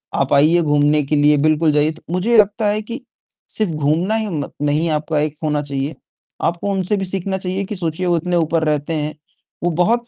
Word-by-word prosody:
आप 140 +1 +1
आइए 155 +5 +5
घूमने 150 0 +2
के 150 +2 -1
लिए 150 0 +4
बिल्कुल 155 0 +3
जाइए 150 +1 +2
तो 160 - -12
मुझे 225 +6 +2
लगता 210 +1 +3
है 210 +1 +1
कि, 235 +5 -7 0.5
सिर्फ़ 215 -6 -1
घूमना 155 +8 +1
ही 220 -1 0 0.4
नहीं 155 +3 +1
आपका 150 0 -1
एक 150 0 -1
होना 150 -1 0
चाहिए, 140 +1 -3 0.5
आपको 170 +4 -1
उनसे 195 +2 +1
भी 190 - -2
सीखना 190 +1 -1
चाहिए 190 +1 -3
कि 210 - -5
सोचिए 175 0 -2
वो 170 -1 +2
इतने 175 +2 -1
ऊपर 165 -1 +1
रहते 150 +1 -1
हैं। 150 0 -2 0.5
वो 175 - +1
बहुत 235 +5 +1
165 Hz, 205 wpm, -19 LUFS, 150-190 Hz, 0.5 s, आइए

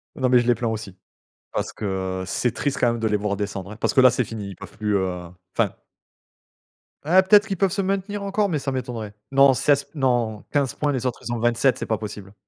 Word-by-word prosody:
Non, 130 -1 +1
mais 125 -1 +6
je 120 - -1
les 120 - +4
plains 120 - -2
aussi. 110 -4 -4 0.6
Parce - - -2
que 95 -2 -3
c'est 125 +3 0
triste 145 -2 -2
quand 120 - +3
même 115 - -4
de 110 - 0
les 105 - +2
voir 105 0 -2
descendre, 100 -1 -4
hein, 105 - -9
parce - - 0
que - - +6
là 130 - +8
c'est 125 - 0
fini, 105 -2 -6
ils 95 - -8
peuvent - - -12
plus, 105 -1 -1
heu, 90 -2 -1 0.3
enfin - - +1 1.3
eh 180 +5 +6
peut-être 205 +2 +5
qu'ils 195 -3 -3
peuvent 195 -1 +2
se 195 0 0
maintenir 195 +1 -2
encore, 200 +1 +1
mais 155 -5 0
ça 135 0 -3
m'étonnerait. 115 -5 -4 0.2
Non 135 0 +6
16 140 +2 +2
p 140 - -36
non 120 -6 0
15 140 -4 +1
points, 145 -1 0
les 130 -1 -2
autres 125 - -2
ils 120 - -2
ont 120 - -2
27, 120 +2 +2
c'est - - -4
pas 110 - 0
possible. 100 -2 -8
120 Hz, 245 wpm, -23 LUFS, 105-140 Hz, 1.3 s, là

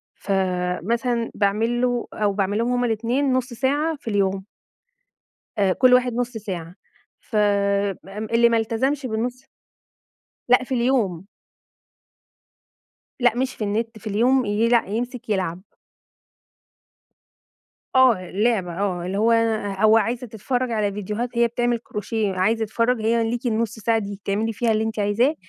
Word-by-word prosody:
فمثلًا 195 +5 -1
باعمل 220 +4 +1
له 245 -1 0
أو 210 -2 0
باعمل 200 +1 0
لهم 235 +2 0
هُم 245 0 +1
الاتنين 240 +5 0
نُص 255 -1 -1
ساعة 290 +6 0
في 275 -5 -8
اليوم. 195 -2 0 1.1
آآ، 195 -2 +3
كل 255 +5 +5
واحد 250 0 +3
نُص 245 0 -1
ساعة 180 -6 -6 0.5
ف 220 - -6
آمم، 200 0 0
اللي 235 0 +6
ما 230 - +2
التزمش 260 +5 0
بالنُص 245 +3 -3 1.1
لأ 250 +1 +5
في 260 - -3
اليوم. 235 -8 +1 2.0
لأ 240 -2 +3
مش 260 +1 -1
في 215 - -4
النت 225 +2 -2
في 220 - -18
اليوم 245 +5 +2
يلأ 225 +2 +2
يمسك 240 +3 -4
يلعب. 185 -3 -1 2.3
آه 235 -9 +4
لعبة 195 -5 0
آه 180 -3 -1
اللي 190 +2 -2
هو 225 +2 +3 0.5
هو 215 +1 +6
عايزة 235 +3 0
تتفرج 245 +3 -2
على 210 -3 0
فيديوهات 210 +4 -3
هي 235 - +5
بتعمل 240 0 0
كروشيه 210 -2 -3
عايز 220 +5 +1
يتفرج، 230 +2 0
هي 225 0 +1
ليكِ 240 +1 -3
النُص 225 -1 -1
ساعة 225 +1 +1
دي 200 -2 -5
بتعملي 205 +3 -2
فيها 230 +1 0
اللي 220 0 +1
أنتِ 220 0 -4
عايزاه 210 +8 +2
225 Hz, 140 wpm, -23 LUFS, 200-245 Hz, 2.3 s, اللي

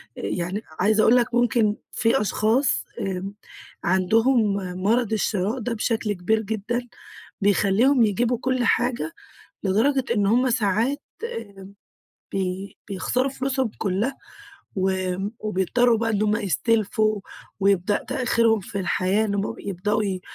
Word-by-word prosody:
يعني 185 +4 -3 0.2
عايزة 215 +3 +3
أقول 235 - +6
لك 240 -1 +2
ممكن 235 -3 +2 0.2
في 225 -2 +2
أشخاص 220 +6 +1
آمم، 195 +1 -3 0.5
عندهم 215 +4 +3 0.3
مرض 230 +1 +2
الشراء 210 +2 0
ده 235 +1 -2
بشكل 225 -1 -1
كبير 210 +4 0
جدًا، 220 +3 -2 0.6
بيخليهم 205 +6 +3
يجيبوا 235 +4 +1
كل 255 -1 0
حاجة 245 +6 0 0.5
لدرجة 245 +8 +2
إن 205 - +2
همّ 250 +4 +3
ساعات 230 +4 +1 0.4
آمم، 200 -3 -12 0.6
بي 190 +1 -3
بيخسروا 250 +7 0
فلوسهم 265 -3 -1
كلها، 210 +7 -1 0.6
و 190 0 +1 0.5
وبيضطروا 215 +4 +2
بقى 230 0 -1
إن 210 -2 0
همّ 210 0 +2
يستلفوا 215 - +1 0.4
ويبدأ 195 0 +2
تأخيرهم 230 -3 +2
في 200 +1 -6
الحياة، 190 +3 +1
إنهم 200 -1 -2
يبدؤوا 205 +3 -1
ي 190 -3 -2
215 Hz, 120 wpm, -24 LUFS, 195-240 Hz, 0.6 s, أقول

